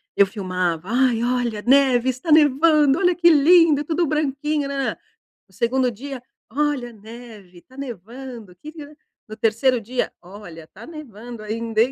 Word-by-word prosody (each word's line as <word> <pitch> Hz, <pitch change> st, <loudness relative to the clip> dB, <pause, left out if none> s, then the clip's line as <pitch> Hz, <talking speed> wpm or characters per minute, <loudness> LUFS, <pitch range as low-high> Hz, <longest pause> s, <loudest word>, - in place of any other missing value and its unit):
Eu 200 Hz, -, +5 dB
filmava, 185 Hz, -3 st, -3 dB
"Ai 245 Hz, -1 st, +2 dB
olha 245 Hz, -3 st, -1 dB
neve, 260 Hz, 0 st, +3 dB
está 260 Hz, +6 st, -3 dB
nevando, 300 Hz, -1 st, +4 dB
olha 360 Hz, -2 st, +3 dB
que 345 Hz, -1 st, +4 dB
lindo 315 Hz, -1 st, +5 dB
tudo 330 Hz, +2 st, -1 dB
branquinho 300 Hz, 0 st, -1 dB
nã 280 Hz, -, -4 dB
nã 275 Hz, -, -1 dB
nã". -, -, -11 dB, 0.5 s
No 190 Hz, -, -26 dB
2º 250 Hz, +3 st, +1 dB
dia, 265 Hz, +3 st, -8 dB, 0.3 s
"Olha 285 Hz, -3 st, -1 dB
neve 215 Hz, -4 st, -13 dB
tá 260 Hz, +7 st, -21 dB
nevando 240 Hz, -3 st, -9 dB
que 300 Hz, +12 st, -11 dB
li" 310 Hz, -2 st, -10 dB, 0.4 s
no 215 Hz, -, -7 dB
3º 235 Hz, +3 st, +1 dB
dia, 245 Hz, +4 st, -3 dB
"Olha 175 Hz, -4 st, -12 dB
tá 215 Hz, +4 st, -14 dB
nevando 240 Hz, -7 st, -10 dB
ainda 225 Hz, +1 st, -2 dB
hein?" 250 Hz, -, +2 dB
250 Hz, 160 wpm, -21 LUFS, 215-290 Hz, 0.5 s, Eu